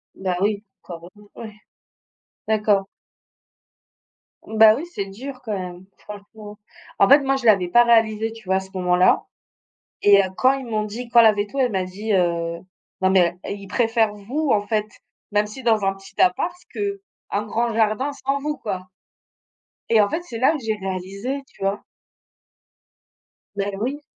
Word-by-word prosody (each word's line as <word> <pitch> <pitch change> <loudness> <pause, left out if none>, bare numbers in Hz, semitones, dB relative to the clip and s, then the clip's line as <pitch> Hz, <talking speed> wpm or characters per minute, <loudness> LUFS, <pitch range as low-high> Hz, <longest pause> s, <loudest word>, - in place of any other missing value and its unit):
Bah 185 -2 -2
oui, 205 0 0 0.2
quand 170 -2 -9
même, 210 0 -18
ouais. 220 -2 -9 0.9
D'accord. 210 -2 +2 1.6
Bah 220 0 +6
oui, 280 - -5
c'est 200 - -3
dur 255 +7 -9
quand 220 -4 -4
même, 180 0 -7
franchement. 210 0 -11 0.4
En 200 - +5
fait, 280 +2 +8
moi 270 0 +1
je 250 - -7
l'avais 195 -5 +4
pas 240 +7 +5
réalisé, 225 -2 +2
tu 225 -2 -13
vois? 190 - +1
À - - +2
ce 190 0 -11
moment 180 -1 +1
là 180 +1 +4 0.8
et 200 -1 +6
heu, 190 - -2
quand 260 +1 +4
ils 270 -2 -5
m'ont 215 -2 -1
dit 230 +4 -7
quand 235 0 +6
la 220 -1 +7
véto 205 +6 -4
elle 250 -4 +2
m'a 190 -2 0
dit, 205 +4 -4
heu: 170 -3 0 0.4
«Non 190 - +3
mais 180 -2 +3
heu, - - -5
il 200 -1 -6
préfère 225 0 +1
vous, 260 +9 -3
en 205 -1 +1
fait, 215 0 0 0.5
même 210 0 +2
si 215 +5 -10
dans 220 -4 +2
un 195 - +1
petit 195 0 -11
appart, 260 - +2 0.2
qu'un 400 - -5
grand 230 +2 -1
jardin 225 +5 +1
sans 275 0 -2
vous 295 +1 -4
quoi». 185 -4 -5 1.0
Et 225 -2 +5
en 205 - +2
fait, 330 - -2
c'est 235 -10 -7
là 260 - +4
que 305 -5 -4
j'ai 220 -1 -1
réalisé, 195 +7 -4
tu - - -23
vois? 195 +1 -1 1.7
Beh, 200 0 -2
oui. 270 +7 -3
215 Hz, 175 wpm, -22 LUFS, 195-240 Hz, 1.7 s, fait